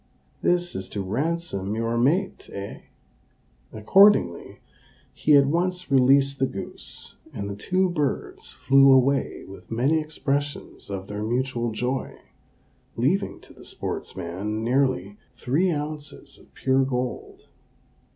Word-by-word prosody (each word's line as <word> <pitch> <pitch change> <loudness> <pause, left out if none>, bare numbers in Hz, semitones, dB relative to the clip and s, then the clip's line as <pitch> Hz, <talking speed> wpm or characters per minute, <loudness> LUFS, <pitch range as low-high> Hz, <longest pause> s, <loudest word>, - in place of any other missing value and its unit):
this 175 0 +1
is 95 0 -5
to 105 - -5
ransom 115 - -2
your 115 +1 -1
mate, 155 +12 0
eh?" 100 0 -7 0.9
Accordingly, 110 - +4 0.5
he 150 - +3
at 140 -1 +6
once 180 +2 -1
released 135 +1 +4
the 135 - +2
goose, 100 - -8
and 100 - -5
the 100 - -5
two 185 - +1
birds 150 -6 -2
flew 135 +1 +5
away 135 +1 +2
with 95 - -12
many 130 +8 +2
expressions 145 -4 -3
of 95 -1 -5
their 105 +1 -5
mutual 120 +1 -1
joy, 125 +4 -3 0.8
leaving 155 - 0
to - - -15
the - - -15
sportsman 100 +6 -4
nearly 120 -6 0 0.2
three 160 +9 +1
ounces 150 -2 -6
of - - -21
pure 135 0 +2
gold. 125 -1 -4
135 Hz, 120 wpm, -25 LUFS, 110-150 Hz, 0.9 s, at